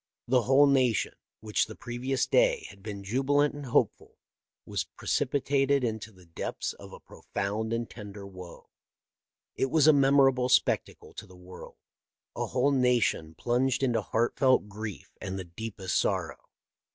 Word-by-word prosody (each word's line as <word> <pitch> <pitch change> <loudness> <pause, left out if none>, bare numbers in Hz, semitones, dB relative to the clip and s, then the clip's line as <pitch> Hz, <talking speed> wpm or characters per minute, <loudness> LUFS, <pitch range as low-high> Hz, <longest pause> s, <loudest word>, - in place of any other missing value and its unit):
The 125 +1 +3
whole 135 +4 +5
nation, 130 -5 +2 0.3
which 105 -1 0
the - - -9
previous 130 +2 -2
day - - +2
had 100 - -17
been 100 -1 -7
jubilant 135 +7 +1
and 145 -2 -8
hopeful, 120 - 0 0.5
was - - -2
precipitated 140 0 0
into 110 -2 -3
the 95 -3 -19
depths 85 - -4
of - - -13
a - - -11
profound 105 +3 -4
and 115 0 -1
tender 105 -2 -10
woe. 90 -3 -12 0.8
It 135 - 0
was 155 0 +3
a 155 - +8
memorable 135 -2 +4
spectacle 125 - +1
to - - -9
the 90 - -16
world 90 0 -12 0.4
— - - -64
a - - -2
whole 135 +3 +1
nation 125 - +1
plunged 125 - 0
into 120 -4 +1
heartfelt 120 +2 +2
grief 105 -5 -7
and 95 0 -4
the 95 - -4
deepest 95 +1 -5
sorrow. - - -2
120 Hz, 150 wpm, -28 LUFS, 100-135 Hz, 0.8 s, a